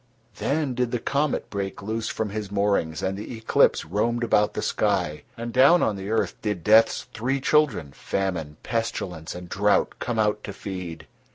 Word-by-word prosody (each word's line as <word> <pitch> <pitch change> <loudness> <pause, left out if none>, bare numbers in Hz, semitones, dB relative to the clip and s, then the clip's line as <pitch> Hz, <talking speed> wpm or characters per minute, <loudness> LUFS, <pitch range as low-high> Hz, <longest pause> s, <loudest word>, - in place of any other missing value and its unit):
Then 145 -2 0
did 125 -1 0
the 120 - -1
comet 140 +4 -1
break 100 -1 -4
loose 110 +2 -2
from 110 -2 -2
his 105 -1 -4
moorings 100 -6 0
and 95 +1 0
the 110 +4 -6
eclipse 110 - +3
roamed 115 +8 0
about 105 -2 +2
the - - -2
sky, 90 -8 0 0.2
and 115 0 -5
down 140 +7 +6
on 105 - +1
the 95 +1 -6
earth 110 0 +1
did 105 -6 -2
Death's 110 +3 +5
three 130 +5 -1
children—Famine, 95 - 0
Pestilence, 100 -8 -3
and 90 0 -8
Drought—come 105 +4 +1
out 105 -1 +1
to 100 - -6
feed. 90 -4 -6
105 Hz, 165 wpm, -25 LUFS, 95-115 Hz, 0.2 s, down